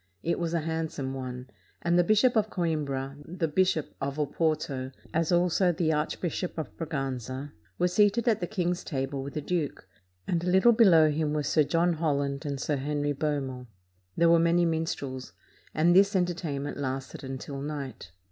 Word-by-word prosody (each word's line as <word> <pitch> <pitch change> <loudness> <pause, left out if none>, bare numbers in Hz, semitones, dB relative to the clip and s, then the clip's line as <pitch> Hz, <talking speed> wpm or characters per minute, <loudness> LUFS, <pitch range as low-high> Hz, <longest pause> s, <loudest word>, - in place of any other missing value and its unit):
It 170 - 0
was 170 -1 -1
a 165 - +1
handsome 160 -4 -3
one; 130 -1 -6 0.4
and 170 0 +2
the 175 - +5
Bishop 215 +6 +4
of 215 -1 +2
Coimbra, 145 -7 -2
the 165 +1 -2
Bishop 165 -1 +1
of 140 +1 -2
Oporto, 150 -3 -1 0.2
as 165 +1 +1
also 180 +1 +3
the 160 -1 +1
Archbishop 165 +4 -2
of 160 - -5
Braganza, 135 -3 -4 0.3
were 180 - +3
seated 205 +5 +3
at 225 -3 +3
the 175 - -2
king's 180 -3 -1
table 135 -2 -3
with 140 +1 -7
the 150 - -1
duke, 150 - -3 0.4
and 170 -1 0
a - - -2
little 190 +6 +6
below 170 -9 +6
him 150 0 -1
were 150 -1 0
Sir 155 - +3
John 170 +4 +2
Holland 145 -2 -1
and 140 -1 -3
Sir 145 +2 -1
Henry 145 +1 -1
Beaumont. 135 -4 -3 0.5
There 170 - +5
were 170 - +6
many 170 +1 +3
minstrels, 150 -6 -3 0.4
and 170 +3 +3
this 200 +2 +5
enter 180 -1 +2
tainment 145 -4 -4
lasted 135 -1 -4
until 135 +1 -6
night. 145 -2 -6
155 Hz, 175 wpm, -28 LUFS, 140-175 Hz, 0.5 s, little